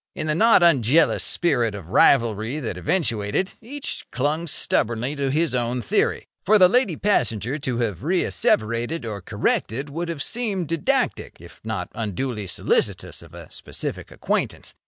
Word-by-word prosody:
In 155 - -4
the 155 - 0
not 220 +2 +5
unjealous 155 -1 +4
spirit 120 -11 +1
of 90 -5 -9
rivalry 115 +3 +3
that 115 -9 -4
eventuated, 120 - -1
each 275 +5 -6
clung 150 +6 -1
stubbornly 120 -1 -1
to 140 -1 -1
his 155 +3 +1
own 125 0 0
theory. - - 0 0.2
For 215 +2 +5
the 185 -2 +7
lady 210 -3 +2
passenger 125 - 0
to 130 -4 -2
have 110 -7 -2
reasseverated 120 - 0
or 105 -3 -5
corrected 135 +9 -1
would 170 +3 -4
have 165 -4 -3
seemed 205 -9 -1
didactic 165 -3 -1
if 85 0 -15
not 110 -5 -4
unduly 110 0 -3
solicitous - - -1
of - - -14
a - - -11
specific - - -6
acquaintance. - - -3
135 Hz, 150 wpm, -23 LUFS, 110-170 Hz, 0.2 s, the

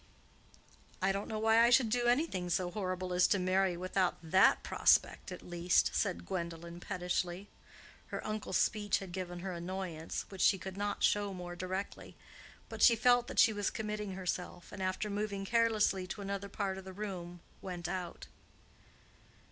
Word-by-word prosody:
"I 190 0 +2
don't 195 +1 -3
know 220 - -3
why 225 +1 +5
I 235 - +6
should 240 -1 +5
do 240 0 +1
anything 240 - +1
so 175 0 0
horrible 185 -2 -3
as 180 0 +5
to 205 - +2
marry 185 -1 +1
without 185 0 0
that 185 +4 +4
prospect, - - +2
at 180 - -8
least," 175 0 +2
said 85 0 -1
Gwendolen, 170 - -5
pettishly. 180 +2 -3 0.6
Her - - -5
uncle's 215 -3 -2
speech 210 -2 +1
had 190 -2 -8
given 175 -1 -5
her 190 +1 -4
annoyance, 175 -2 -4
which 195 -2 -6
she 195 - +5
could 190 +1 -7
not 205 0 -2
show 205 -2 +2
more 175 -1 -6
directly; 185 +2 -5 0.5
but - - -7
she 235 - +8
felt 245 +1 +4
that - - -7
she 220 - +6
was 205 -1 0
committing 210 -2 -4
herself, 180 -1 -4
and 200 - -7
after 185 +3 -1
moving 205 -1 -3
carelessly 215 -4 +2
to 205 - -6
another 200 0 -4
part 195 -1 -3
of - - -10
the 190 0 -9
room, 180 -3 -6 0.2
went 175 -2 -5
out. 180 -1 -5
190 Hz, 170 wpm, -33 LUFS, 180-205 Hz, 0.6 s, she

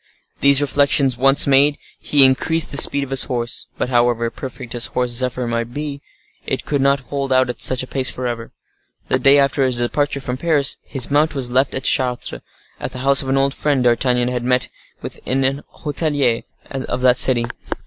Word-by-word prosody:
These 140 0 +5
reflections 140 -2 +2
once 135 +3 +4
made, 140 +1 +3 0.2
he 140 -2 +4
increased 155 +5 +1
the 140 - -4
speed 140 0 +4
of 135 - -9
his 135 - +4
horse. 120 -1 -4
But, - - -2
however 120 -2 +1
perfect 130 -2 -9
his 120 -1 -1
horse 125 -1 -2
Zephyr 125 +1 -1
might 115 0 -4
be, 145 -1 -5 0.4
it - - -4
could 145 -2 -1
not 140 0 +2
hold 140 -1 -3
out 130 -1 +2
at - - -14
such 130 0 0
a - - -9
pace 130 -1 +2
forever. 120 -2 -5 0.6
The 130 - +1
day 140 +2 +5
after 140 0 +1
his 130 -2 0
departure 140 +4 -1
from 125 -2 -5
Paris, 145 -2 +1
his 135 -2 0
mount 150 +2 +1
was 125 -3 0
left 130 +2 +1
at 130 - -4
Chartres, 125 - 0 0.4
at - - -6
the - - -7
house 140 0 +4
of 135 - -6
an 135 - +1
old 135 0 +1
friend 145 -4 0
D'Artagnan 125 0 +1
had 125 -1 -3
met 125 0 0 0.3
with - - -8
in 135 +1 -1
an 135 +2 -1 0.2
hotelier 145 -5 -1 0.3
of 130 -2 -4
that 125 -1 +3
city. 120 -3 +4
130 Hz, 200 wpm, -18 LUFS, 125-140 Hz, 0.6 s, These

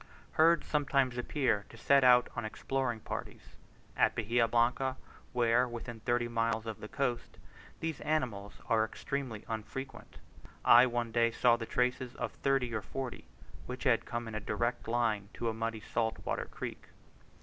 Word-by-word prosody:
Herds 165 +1 +4
sometimes 140 -4 +1
appear 125 -4 0
to - - -13
set 140 -1 +4
out 125 -1 +6
on 120 - -3
exploring 120 +1 -2
parties: - - -7 0.4
at - - +3
Bahia 115 +1 +2
Blanca, 125 +3 +1 0.3
where, 120 +1 +3
within 120 -1 -7
thirty 120 +1 0
miles 115 -1 0
of 110 -3 -5
the 105 - -7
coast, 125 -1 -2 0.4
these 160 -2 -3
animals 120 -10 -1
are 110 -1 +3
extremely 115 0 -4
unfrequent, 125 +5 -6 0.5
I 120 +2 +8
one 120 -1 -2
day 115 0 +3
saw 120 +1 +4
the 115 -1 -5
tracks 125 +1 +1
of - - -3
thirty 135 -4 0
or 110 - -1
forty, 120 +9 -6 0.4
which 125 0 -6
had 125 -4 +3
come 120 -1 -3
in 115 - -6
a 110 - -2
direct 120 +3 -2
line 115 -4 0
to 115 - -1
a - - -2
muddy 115 0 -3
salt 110 +1 -1
water - - -1
creek. - - -7
120 Hz, 160 wpm, -32 LUFS, 115-130 Hz, 0.5 s, I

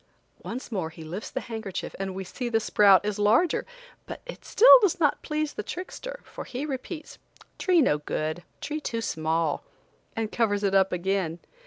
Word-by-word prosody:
Once 245 +1 -6
more 185 -7 -2
he 160 0 -11
lifts 175 +7 -6
the - - -4
handkerchief 220 -5 -5
and 190 -1 -3
we 190 - -4
see 240 +6 -5
the 225 -1 +2
sprout 205 -3 +5
is 210 0 -2
larger, 230 - +3 0.4
but - - -6 0.2
still 475 - +4
it - - -1
does 375 -4 +2
not 295 -3 +2
please 305 0 -2
the - - -4
trickster, - - -7
for - - -8
he 260 +4 -5
repeats: 300 +3 -6 0.4
"Tree 360 -4 +4
no 150 -11 +2
good; 155 +3 -3 0.2
tree 305 0 -3
too 230 -5 -3
small," 160 -5 -1 0.5
and 225 -2 -2
covers 205 -3 +1
it 195 -1 +1
up 195 -1 +4
again. 180 -2 -1
210 Hz, 180 wpm, -27 LUFS, 185-295 Hz, 0.5 s, sprout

